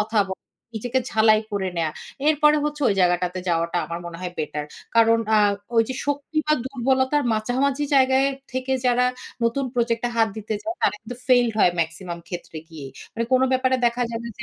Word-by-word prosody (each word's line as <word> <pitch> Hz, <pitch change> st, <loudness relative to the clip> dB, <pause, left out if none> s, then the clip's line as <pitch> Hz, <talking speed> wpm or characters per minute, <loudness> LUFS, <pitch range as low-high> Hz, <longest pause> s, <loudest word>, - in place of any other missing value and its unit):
কথা 215 Hz, 0 st, +1 dB
বলা। 190 Hz, -, -7 dB, 0.3 s
নিজেকে 245 Hz, +4 st, -1 dB
ঝালাই 220 Hz, 0 st, +4 dB
করে 195 Hz, -2 st, -1 dB
নেয়া। 160 Hz, -2 st, 0 dB, 0.4 s
এরপরে 300 Hz, 0 st, +4 dB
হচ্ছে 295 Hz, 0 st, -3 dB
ওই 200 Hz, -, +2 dB
জায়গাটাতে 180 Hz, 0 st, +1 dB
যাওয়াটা 170 Hz, +1 st, 0 dB
আমার 170 Hz, 0 st, -5 dB
মনে 170 Hz, -1 st, -8 dB
হয় 180 Hz, -1 st, -5 dB
বেটার। 150 Hz, -1 st, -3 dB, 0.3 s
কারণ 230 Hz, 0 st, +5 dB, 0.2 s
আ -, -, +6 dB, 0.4 s
ওইযে 225 Hz, +3 st, +2 dB
শক্তি 285 Hz, +2 st, -2 dB
বা 305 Hz, -, +3 dB
দুর্বলতার 265 Hz, +2 st, +1 dB
মাঝামাঝি 260 Hz, +6 st, 0 dB
জায়গায় 265 Hz, +1 st, +4 dB, 0.2 s
থেকে 260 Hz, +1 st, -2 dB
যারা 250 Hz, 0 st, +3 dB, 0.4 s
নতুন 235 Hz, +4 st, +1 dB
প্রজেক্টটা 235 Hz, 0 st, 0 dB
হাত 225 Hz, -1 st, +4 dB
দিতে 215 Hz, 0 st, -4 dB
যায়, 335 Hz, +1 st, -4 dB
তারা 205 Hz, -, +2 dB
কিন্তু 240 Hz, +2 st, -8 dB
ফেইলড 245 Hz, -2 st, +4 dB
হয় 180 Hz, -, +5 dB
মেক্সিমাম 170 Hz, +2 st, -4 dB
ক্ষেত্রে 175 Hz, -3 st, -7 dB
গিয়েই। 150 Hz, -5 st, -9 dB, 0.2 s
মানে 230 Hz, -, -1 dB
কোনো 255 Hz, 0 st, +5 dB
ব্যাপারে 260 Hz, 0 st, +2 dB
দেখা 240 Hz, +1 st, 0 dB
যাবে 235 Hz, +1 st, -4 dB
যে -, -, -6 dB
230 Hz, 180 wpm, -23 LUFS, 185-260 Hz, 0.4 s, আ